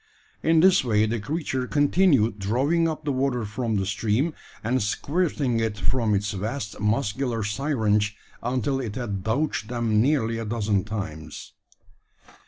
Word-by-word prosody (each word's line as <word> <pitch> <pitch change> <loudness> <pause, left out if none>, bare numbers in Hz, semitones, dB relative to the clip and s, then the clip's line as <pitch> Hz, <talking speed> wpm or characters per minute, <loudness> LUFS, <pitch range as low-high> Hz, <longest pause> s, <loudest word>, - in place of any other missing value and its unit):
In 160 0 +4
this 185 -3 +5
way 110 -3 +3
the 115 +1 -1
creature 130 +1 -2
continued 145 - +3
drawing 135 - +1
up 155 -1 -5
the 145 - +1
water 130 -3 0
from 110 +1 -2
the 95 -1 0
stream, 110 - 0 0.3
and 125 +4 +1
squirting 140 - 0
it 110 -2 -1
from 110 0 +1
its 100 +1 -1
vast 105 +4 -4
muscular 115 +2 0
syringe, 105 -2 0 0.2
until 130 +2 -1
it 115 -6 -4
had 105 -7 -3
douched 115 0 -1
them 115 -3 +1
nearly 115 -4 +1
a 115 - -4
dozen 105 -3 0
times. 100 -8 -6
115 Hz, 145 wpm, -25 LUFS, 105-140 Hz, 0.3 s, this